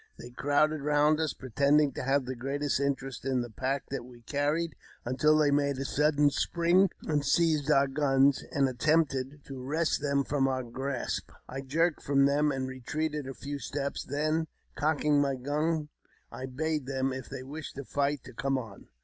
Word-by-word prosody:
They 120 - -10
crowded 145 +4 +1
round 150 +1 +3
us, 160 -3 0
pretending 140 +3 +2
to - - -5
have 135 +1 +1
the 130 - -3
greatest 140 +3 -1
interest 135 -1 -2
in 130 -1 0
the 120 -1 -6
pack 130 +4 -2
that 135 - -3
we 120 -1 -14
carried, 150 +5 0 0.3
until 150 +5 +3
they 150 -2 +4
made 140 -1 +1
a 135 - -3
sudden 150 0 +3
spring, 175 +6 +3
and 150 -2 0
seized 155 0 +2
our 140 -2 +5
guns, 135 -1 +3
and 140 -3 +2
attempted 140 0 0
to 135 -2 -7
wrest 155 +3 0
them 140 -1 +1
from 135 -1 +1
our 130 -1 -1
grasp. 130 +2 -3 0.2
I 135 +1 -5
jerked 160 +5 +1
from 140 -1 +3
them, 145 +2 +3
and 135 -1 -2
retreated 145 +3 -3
a 135 - -6
few 140 0 -5
steps; 140 0 -3
then, 155 +3 -1 0.3
cocking 150 -1 +2
my 140 -1 +1
gun, 150 +4 -1 0.4
I 130 - -6
bade 150 +1 -2
them, 135 -1 -1
if 130 -2 -7
they 130 - -6
wished 145 +2 -7
to 140 0 -6
fight, 145 +1 -1
to - - -12
come 135 +2 0
on. 110 -7 -8
140 Hz, 185 wpm, -29 LUFS, 135-150 Hz, 0.4 s, our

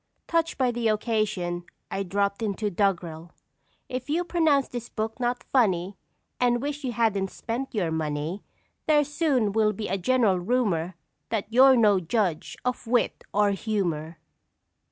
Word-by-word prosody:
Touched 330 -1 0
by 255 -2 +2
the 235 -1 -1
occasion, 210 -5 0 0.3
I 195 - -2
"drop 200 +2 -1
into" 210 -1 -1
doggerel: 175 -4 -1 0.5
If 255 +2 -5
you 335 +4 +1
pronounce 320 -6 +2
this 240 -1 -6
book 220 +2 -4
not 245 0 -1
funny, 195 -7 +1 0.4
And 240 -1 +3
wish 290 +2 -4
you 250 -2 -2
hadn't 210 -4 +1
spent 240 +5 -5
your 175 -6 0
money, 155 +4 -2 0.4
There 300 -1 +5
soon 285 -7 +1
will 215 0 +2
be 210 +1 -4
a 195 +1 -1
general 220 -3 +2
rumor 185 -5 0 0.3
That 220 0 -3
you're 265 +2 +7
no 210 -5 +4
judge 180 -2 -1
of 250 -1 -2
Wit 240 +1 +1
or 205 0 +3
Humor. 175 -6 -2
215 Hz, 150 wpm, -26 LUFS, 190-250 Hz, 0.5 s, you're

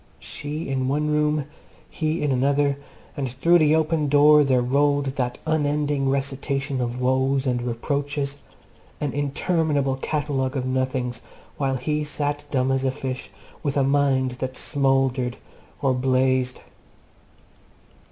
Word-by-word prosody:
She 150 +2 -6
in 130 -1 -1
one 150 +3 0
room, 150 -1 +1 0.4
he 155 +1 -2
in 145 - +1
another, 140 +2 +2 0.4
and 135 -3 -2
through 165 +8 +3
the 155 0 +4
open 160 -1 +1
door 150 +1 +6
there 130 -3 +2
rolled 140 +2 +2
that 125 -3 -2
unending 145 -3 +1
recitation 135 0 -1
of 120 0 -3
woes 130 +1 +1
and 125 -2 0
reproaches, 140 +4 -2 0.6
an 145 -3 -2
interminable 145 -1 0
catalogue 140 -2 -1
of 130 - -2
nothings, 130 -2 -1 0.4
while 135 -2 0
he 150 +4 -1
sat 145 0 -3
dumb 130 -1 +1
as 135 0 +1
a 135 - +2
fish, 130 -1 -5 0.3
with 145 -2 -1
a 140 - +3
mind 135 -2 +2
that 130 0 -3
smouldered 135 -3 +1 0.5
or 135 -1 +3
blazed. 130 0 +1
140 Hz, 135 wpm, -24 LUFS, 130-145 Hz, 0.6 s, door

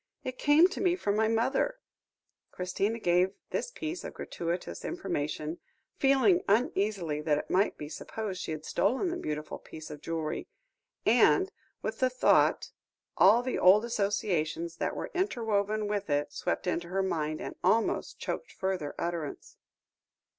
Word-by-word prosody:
It 255 0 -5
came 300 +4 +6
to 380 - -5
me 360 -2 +3
from 205 - -1
my 220 +1 +3
mother." 260 - +1 0.7
Christina 195 +5 -1
gave 180 -1 +2 0.2
this - - -1
piece 335 -7 -5
of - - -7
gratuitous 170 - -4
information, 150 +2 -3 0.4
feeling 275 +7 +4
uneasily 200 - +1
that 150 -1 +2
it - - -5
might 195 +3 +2
be 150 - -6
supposed 190 +5 -5
she - - -5
had 155 0 -5
stolen 265 - +1
the - - -2
beautiful 150 - -4
piece 155 0 -10
of 150 - -9
jewellery; 160 -2 -3 0.6
and, 380 +1 +5 0.3
with - - -3
the 255 - +3
thought, 255 0 +3 0.4
all 220 +6 +6
the 255 - -1
old 200 +5 +6
associations 190 -7 -1
that - - -2
were - - -5
interwoven 215 - 0
with 205 -3 -2
it 145 0 0
swept - - -2
into 175 -1 -1
her 190 +2 0
mind, 155 -4 -1
and - - -6
almost 225 0 +1
choked - - -4
further 190 -6 -3
utterance. 170 -4 -4
195 Hz, 150 wpm, -30 LUFS, 165-240 Hz, 0.7 s, came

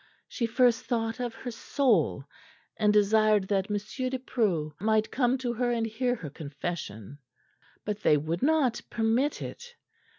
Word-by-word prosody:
She 235 - -2
first 240 0 +3
thought 225 0 -1
of 240 -2 -3
her 245 +2 -6
soul, 215 - +1 0.5
and 210 -1 +3
desired 210 -1 +4
that 195 -1 0
M. 210 - 0
de 255 +5 -3
Preau 195 -12 -1
might 220 +2 +1
come 250 0 +2
to 245 -2 -2
her 245 +1 0
and 230 -1 0
hear 245 +3 -1
her 155 -10 -7
confession; 145 - -6 0.7
but 210 -1 -2
they 150 - +4
would 160 +4 -3
not 295 -5 +2
permit 235 +6 0
it. 485 0 -9
225 Hz, 155 wpm, -28 LUFS, 195-245 Hz, 0.7 s, desired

